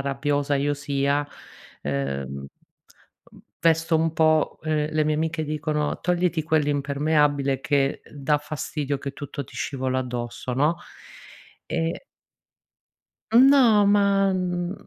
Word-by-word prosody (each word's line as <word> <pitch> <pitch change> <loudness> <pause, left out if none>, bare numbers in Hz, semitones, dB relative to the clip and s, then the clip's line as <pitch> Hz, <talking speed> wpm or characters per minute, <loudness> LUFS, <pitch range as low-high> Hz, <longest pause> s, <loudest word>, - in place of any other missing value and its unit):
rabbiosa 140 +1 0
io 145 +1 0
sia. 140 0 -1 0.6
Ehm, 70 -1 -3 0.9
ehm, - - -16 0.2
vesto 165 0 +3
un 160 0 +1
po' 155 -1 +2
ehm, 155 -1 -1
le 155 0 +2
mie 155 0 +1
amiche 160 +1 -1
dicono: 150 0 -2
"Togliti 175 -2 0
quell'impermeabile 145 -2 +1
che, 140 -1 0
ehm, - - -19
dà 145 +1 +1
fastidio 145 -1 -4
che 140 0 -6
tutto 140 -1 -6
ti - - -17
scivola 130 -1 -2
addosso", 120 -1 -5
no. 150 +6 +2 0.9
E 165 - -2 1.3
No 245 -4 +6
ma, 200 -1 +3
mhmm, 180 -1 -2
150 Hz, 115 wpm, -24 LUFS, 140-160 Hz, 1.3 s, No